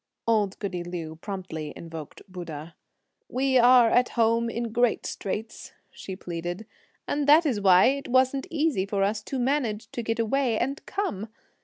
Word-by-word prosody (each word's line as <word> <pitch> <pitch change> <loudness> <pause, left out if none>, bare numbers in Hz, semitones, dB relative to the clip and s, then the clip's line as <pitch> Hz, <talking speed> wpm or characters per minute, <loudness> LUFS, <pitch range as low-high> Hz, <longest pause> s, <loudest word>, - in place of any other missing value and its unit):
Old 210 -4 +1
goody 180 -4 -4
Liu 165 -2 -6
promptly 175 -5 -6
invoked 165 -3 -9
Buddha. 170 -4 -8 0.6
"We 260 0 +2
are 245 0 +7
at 250 0 +3
home 230 0 +3
in 235 0 -3
great 240 0 +1
straits," 215 +3 -5 0.2
she 190 - -8
pleaded, 175 +3 -5 0.4
"and 290 -1 -1
that's 295 -6 +5
why 185 -2 +6
it 275 +2 +1
wasn't 260 +2 +2
easy 300 - 0
for 195 -1 0
us 210 +2 0
to 265 - -5
manage 245 -5 -1
to 240 - -4
get 225 0 -2
away 230 +1 +1
and 275 +5 -2
come! 225 - -3
220 Hz, 155 wpm, -26 LUFS, 185-255 Hz, 0.6 s, are